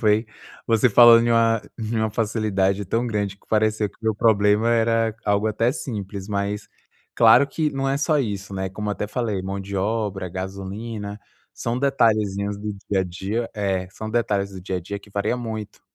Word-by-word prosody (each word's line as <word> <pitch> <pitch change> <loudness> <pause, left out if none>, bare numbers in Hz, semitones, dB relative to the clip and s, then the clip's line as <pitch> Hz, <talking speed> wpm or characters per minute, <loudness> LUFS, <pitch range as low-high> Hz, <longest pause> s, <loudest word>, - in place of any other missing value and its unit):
foi, 110 0 +3 0.4
você 115 +2 +4
falando 115 +1 +7
em - - +2
uma 115 -1 +3 0.2
em 110 +1 -3
uma 110 -1 +1
facilidade 105 -3 0
tão 115 +5 0
grande 105 -3 -2
que - - -31
pareceu 110 -1 +1
que - - -27
meu 110 -2 0
problema 105 +1 +3
era 115 -1 +2
algo 105 +1 +1
até 115 +3 +1
simples, 100 -8 -5
mas 100 +1 -2 0.5
claro 140 - +6
que 150 +1 -1
não 135 0 -2
é 135 +1 0
só 150 0 +2
isso, 100 -5 -3
né, 95 0 -2
como 105 +2 -5
eu - - +1
até 105 - -3
falei 110 -6 -2
mão 95 +1 -4
de 100 +1 -5
obra, 100 -2 -1
gasolina, 100 +3 -6 0.3
são 120 +1 -3
detalhezinhos 105 -7 +1
do 105 0 -4 0.2
dia 100 -2 +2
a 95 - 0
dia 100 +6 -3
é, 95 -3 -1
são 110 +2 -7
detalhes 105 -4 0
do 95 -1 -9
dia 95 0 -3
a - - -3
dia 100 +4 -6
que 105 - -18
varia 105 +4 0
muito. 110 -3 -6
105 Hz, 190 wpm, -23 LUFS, 100-115 Hz, 0.5 s, falando